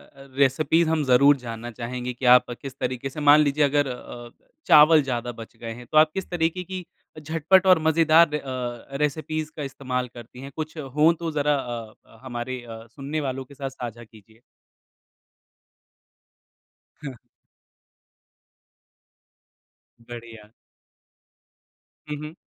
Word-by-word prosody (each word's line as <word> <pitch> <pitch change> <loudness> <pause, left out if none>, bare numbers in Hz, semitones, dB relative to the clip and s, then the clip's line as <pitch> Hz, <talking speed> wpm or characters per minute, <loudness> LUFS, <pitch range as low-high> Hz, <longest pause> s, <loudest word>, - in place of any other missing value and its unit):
अ, 135 0 -14
recipes 155 +4 +3
हम 160 -2 +1
ज़रूर 140 +3 +5
जानना 120 -1 -7
चाहेंगे 125 +2 -5
कि 125 +2 -6
आप 125 - +4
किस 135 -2 -7
तरीके 130 +2 -3
से 150 - -8
मान 145 0 +6
लीजिए 150 0 +2
अगर 145 0 +2
अ, 120 -1 -8 0.4
चावल 155 +1 +7
ज़्यादा 120 -2 -3
बच 115 -1 -12
गए 115 -1 -7
हैं 120 +1 -11
तो 155 - +2
आप 155 0 +6
किस 190 - -5
तरीके 175 +1 -1
की 185 0 -7 0.4
झटपट 165 +5 +2
और 180 -3 +6
मज़ेदार 160 -1 +4
अ, 130 -1 -5
रेसिपीज़ 155 +2 -2
का 150 - -5
इस्तेमाल 130 -2 -3
करती 120 +1 -12
हैं? 140 +1 -9
कुछ 155 +1 -6
हो 150 +2 +2
तो 165 -1 -3
ज़रा 150 0 +1
अ 120 -5 -5
अ, - - -20
हमारे 125 0 -5
सुनने 135 +7 -6
वालों 130 -1 -4
के 140 - -16
साथ 135 -1 -5
साझा 120 -3 -8
कीजिए। 110 0 -20 2.6
हाँ। 135 -3 -7 2.8
बढ़िया। 115 -2 -11 1.6
हुँ, 150 - -3
हुँ। 150 +1 -8
135 Hz, 135 wpm, -24 LUFS, 120-155 Hz, 2.8 s, चावल